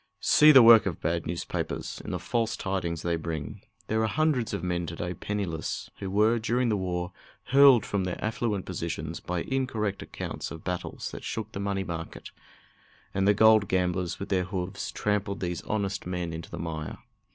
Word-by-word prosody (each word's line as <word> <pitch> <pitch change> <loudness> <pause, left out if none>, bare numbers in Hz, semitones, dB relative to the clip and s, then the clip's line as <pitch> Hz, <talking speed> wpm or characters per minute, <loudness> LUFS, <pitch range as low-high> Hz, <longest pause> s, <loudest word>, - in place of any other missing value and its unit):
See 150 +1 +7
the 135 -4 +9
work 115 -3 +8
of 85 - -3
bad 85 0 -1
newspapers 85 +1 -4
in - - -7
the - - -2
false 115 -2 -1
tidings 85 -4 -2
they 85 -1 0
bring! 80 -4 -5 0.2
There 110 +1 0
are 110 - +2
hundreds 140 -2 +1
of - - -3
men 90 -1 -1
to 85 - -5
day 90 +2 -3
penniless, 90 -3 -4
who 95 - -4
were, 110 +4 +3
during 120 +2 +1
the 110 - +2
war, 90 -2 -2 0.4
hurled 135 -4 +7
from 100 -2 -1
their 90 - -3
affluent 110 -3 -2
positions 85 -2 -4
by 90 -1 -3
incorrect 115 -7 -2
accounts - - -6
of 80 - -9
battles 90 -1 -4
that - - -8
shook 110 -1 -4
the 100 - -6
money 100 -1 -1
market, 85 -3 -7 0.8
and 95 0 +1
the 105 - +5
gold 110 -1 +6
gamblers, 90 -1 0
with 100 - -5
their 95 -2 +1
hoofs, 95 +1 -4
trampled 105 -1 -1
these 90 -2 -3
honest 100 -3 -2
men 90 -2 -3
into 80 0 -7
the - - -7
mire. 80 -2 -5
95 Hz, 185 wpm, -28 LUFS, 85-110 Hz, 0.8 s, the